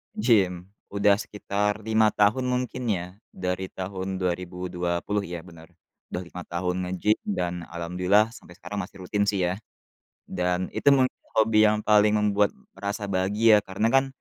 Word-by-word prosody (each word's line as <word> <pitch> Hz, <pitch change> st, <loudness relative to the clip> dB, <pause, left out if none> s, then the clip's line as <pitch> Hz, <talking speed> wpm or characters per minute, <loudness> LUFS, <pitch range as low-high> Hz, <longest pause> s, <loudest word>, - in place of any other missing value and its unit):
gym, 95 Hz, -6 st, +2 dB, 0.2 s
udah 100 Hz, 0 st, +4 dB
sekitar 105 Hz, 0 st, -2 dB
5 110 Hz, 0 st, +3 dB
tahun 105 Hz, +5 st, +3 dB
mungkin, 125 Hz, 0 st, -2 dB
ya, 90 Hz, -3 st, -2 dB, 0.2 s
dari 90 Hz, 0 st, -3 dB
tahun 95 Hz, 0 st, -4 dB
2020 90 Hz, +2 st, -2 dB
iya 85 Hz, 0 st, -5 dB
benar, 85 Hz, -2 st, -14 dB, 0.4 s
udah 90 Hz, -, -3 dB
5 90 Hz, +1 st, -8 dB
tahun 90 Hz, +1 st, -2 dB, 0.2 s
nge-gym 105 Hz, +4 st, +1 dB
dan 90 Hz, -, -1 dB, 0.2 s
alhamdulillah 90 Hz, +6 st, +2 dB
sampai 90 Hz, -, -14 dB
sekarang 105 Hz, +2 st, -6 dB
masih 95 Hz, -, -11 dB
rutin, 100 Hz, +3 st, 0 dB
sih, 100 Hz, -2 st, +1 dB
ya. 95 Hz, -, -5 dB, 0.7 s
Dan 90 Hz, +1 st, -1 dB
itu -, -, +3 dB
mungkin 130 Hz, -2 st, +3 dB, 0.2 s
hobi 110 Hz, -1 st, +5 dB
yang 105 Hz, 0 st, +1 dB
paling 105 Hz, 0 st, +5 dB
membuat 105 Hz, -1 st, +2 dB, 0.2 s
merasa 100 Hz, +1 st, -4 dB
bahagia, 105 Hz, +3 st, +3 dB
karena, 100 Hz, +2 st, -1 dB
kan, 135 Hz, 0 st, +4 dB
100 Hz, 150 wpm, -26 LUFS, 90-105 Hz, 0.7 s, hobi